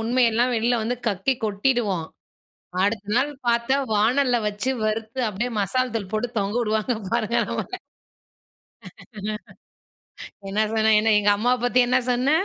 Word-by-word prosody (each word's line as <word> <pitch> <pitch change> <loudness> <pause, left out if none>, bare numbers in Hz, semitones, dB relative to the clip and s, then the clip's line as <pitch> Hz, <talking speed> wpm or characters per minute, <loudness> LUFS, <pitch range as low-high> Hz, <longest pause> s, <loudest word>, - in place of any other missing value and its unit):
உண்மையெல்லாம் 240 +1 +2
வெளியில 235 +2 +1
வந்து 245 +3 -1
கக்கி, 205 +5 +1
கொட்டிடுவோம். 205 -4 0 0.8
அடுத்த 205 +1 0
நாள் 275 +4 +2 0.2
பாத்தா, 235 +2 +2 0.2
வானல்ல 245 +4 +3
வச்சு 210 +6 -2
வறுத்து, 220 +3 -2
அப்டீயே 235 +5 -3
மசால் 255 +5 0
தூள் 200 -3 -4
போட்டு 220 +3 0
தொங்க 200 +3 -2
விடுவாங்க. 220 +2 0 0.2
பாருங்க, 235 0 0
நம்மள. - - -4 2.7
"என்ன 205 +2 -1
சொன்ன? 220 0 +3
என்ன? 220 +1 +2
எங்க 205 0 +3
அம்மாவ 245 +4 +2
பத்தி 245 +1 +3
என்ன 255 +1 +3
சொன்ன? 250 +3 +1
230 Hz, 130 wpm, -23 LUFS, 210-245 Hz, 2.7 s, வானல்ல